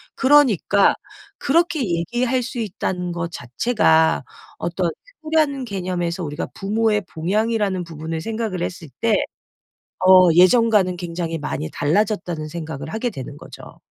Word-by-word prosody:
그러니까 260 - +4 0.5
그렇게 335 +2 +2
얘기할 240 +8 0
수 245 0 -5
있다는 180 -4 -3
것 170 0 -4
자체가 160 - +2 0.4
어떤 170 0 -1 0.3
효라는 305 -4 +1
개념에서 180 -4 -3
우리가 150 +1 -4
부모의 210 +1 0
봉양이라는 200 +2 0
부분을 160 0 -5
생각을 220 -3 -3
했을 175 -2 -5
때 230 -2 +2 0.9
어 185 -1 +7
예전과는 185 0 +4
굉장히 170 -1 -4
많이 150 +1 -4
달라졌다는 175 -1 -1
생각을 160 -2 -6
하게 230 +2 -2
되는 140 -2 -8
거죠. - - -13
185 Hz, 305 characters per minute, -21 LUFS, 165-225 Hz, 0.9 s, 어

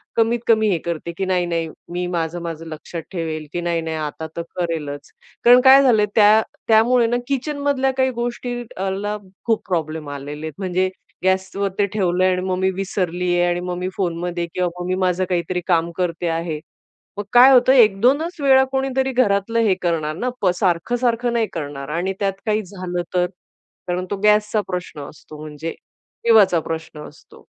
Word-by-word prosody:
कमीत 230 +1 +2
कमी 220 -2 +4
हे 185 - +2
करते, 170 0 -3
की 195 - -1
नाही, 185 -1 +1
नाही, 165 -1 -2 0.2
मी 180 +1 -2
माझं, 170 -1 -2
माझं 165 -1 -6
लक्षात 160 +1 -7
ठेवेल, 160 -4 -4
की 175 - -2
नाही, 170 -1 -1
नाही, 160 0 -4
आता 155 +1 -5
तर - - -1
करेलच. 160 -5 -4 0.4
कारण 245 +1 +8
काय 270 +1 +8
झालं, 225 -6 +4
त्या 215 0 +6 0.3
त्यामुळे 230 +2 +4
ना 240 +1 +1
किचनमधल्या 280 -1 0
काही 260 0 +2
गोष्टीला 235 -4 -4 0.3
खूप 225 -2 +1
प्रॉब्लेम 160 -3 -2
आलेले 145 +2 -6
आहेत. 160 - -5
म्हणजे 185 -1 0 0.3
गॅसवर 190 +1 0
ते 205 - +4
ठेवलं 185 -3 0
आणि 185 -1 +1
मग 185 0 -1
मी 190 0 +2
विसरली 180 -2 -2
आहे 175 - +3
आणि 175 - 0
मग 180 0 -4
मी 180 +1 -3
फोनमध्ये 175 -1 -2
किंवा 180 -1 0
मग 175 - -4
मी 185 - 0
माझं 180 +1 +1
काहीतरी 180 0 -1
काम 170 -2 +2
करते 175 -1 -1
आहे. 165 -1 -2 0.6
मग 205 - -2
काय 250 +2 +8
होतं, 255 +1 +6
एक 215 -6 +5
दोनच 290 +9 +2
वेळा 265 -1 +6
कोणीतरी 265 0 0
घरातलं 230 -2 +1
हे 215 -4 +3
करणार 160 -3 -1
ना, 245 +9 -2
पण 185 - +3
सारखं, 180 +4 0
सारखं 240 -1 0
नाही 230 -2 +1
करणार 145 -2 -5
आणि 185 +3 -1
त्यात 195 -1 0
काही 215 0 +1
झालं 180 -2 -4
तर. 180 0 +3 0.6
कारण 180 +1 -2
तो - - +1
गॅसचा 210 0 +3
प्रश्न 180 -5 -5
असतो 150 0 -13
म्हणजे 155 +1 -6 0.5
जीवाचा 205 -7 +5
प्रश्न 160 -1 -6
असतो. - - -18
185 Hz, 180 wpm, -21 LUFS, 170-225 Hz, 0.6 s, कारण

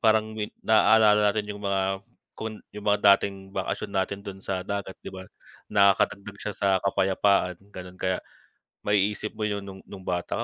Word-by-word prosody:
parang 110 -1 +3
win 105 - -2 0.2
nalala 110 -1 +6
natin 105 0 -2
yung 100 - -9
mga 95 0 0 0.4
kun 110 -1 -5 0.2
yung 105 0 -8
mga 105 0 +3 0.2
dating 95 -1 -6
bakasyon 100 +1 -3
natin 100 +1 -1
dun 95 -1 -7
sa 95 -1 -2
dagat, 100 -2 -4
'di - - -6
ba? 95 0 -8 0.5
Nakakadagdag 100 0 +3
siya 105 - -4
sa 100 - +1 0.2
kapayapaan 95 -1 +2 0.2
ganon, 90 0 -9
kaya 95 0 +1 0.7
maiisip 105 +1 +1
mo 110 - -4
yun 100 -1 -3
nung 95 -1 -9
nung 95 -2 -10
bata 90 -1 -1
100 Hz, 165 wpm, -26 LUFS, 95-105 Hz, 0.7 s, nalala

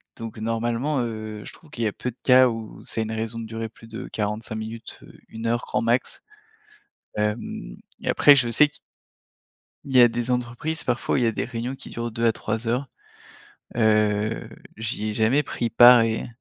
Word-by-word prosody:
donc 115 -1 -8
normalement, 115 +6 -1
heu, 110 -2 -5
je - - -9
trouve 160 -3 -18
qu'il 115 -6 -2
y - - +3
a 105 - -2
peu 125 - -4
de 120 - -25
cas 130 0 +7
où 115 -2 -7
c'est 115 - -2
une 110 0 -3
raison 110 +1 -3
de 115 - -5
durer 115 0 -5
plus 115 +1 -16
de 115 +1 -7
45 110 +1 -3
minutes, 110 +1 -7 0.3
1 115 +1 -5
heure 120 +1 +1
grand - - -1
max, 120 +2 0 0.9
hem, 105 - -3 0.2
et - - -3
après, 145 - +7
je 125 -4 +2
sais 150 +6 +6
que 145 - -13 1.1
il 135 - -5
y 125 - +9
a 120 - +9
des 120 +1 -2
entreprises, 125 +6 -2
parfois, 120 -1 0
où - - +3
il 125 - +2
y - - +4
a - - +2
des - - -2
réunions 120 +2 -4
qui 135 - -11
durent 115 0 -4
2 115 +2 -1
à 115 - +5
3 110 +1 -4
heures, 125 +4 0 0.9
heu, 110 -1 +2 0.3
j'y 110 -1 -3
ai - - -4
jamais 115 +7 +3
pris 120 -4 -3
part 120 +1 +8
et 115 0 -1
115 Hz, 205 wpm, -24 LUFS, 110-125 Hz, 1.1 s, y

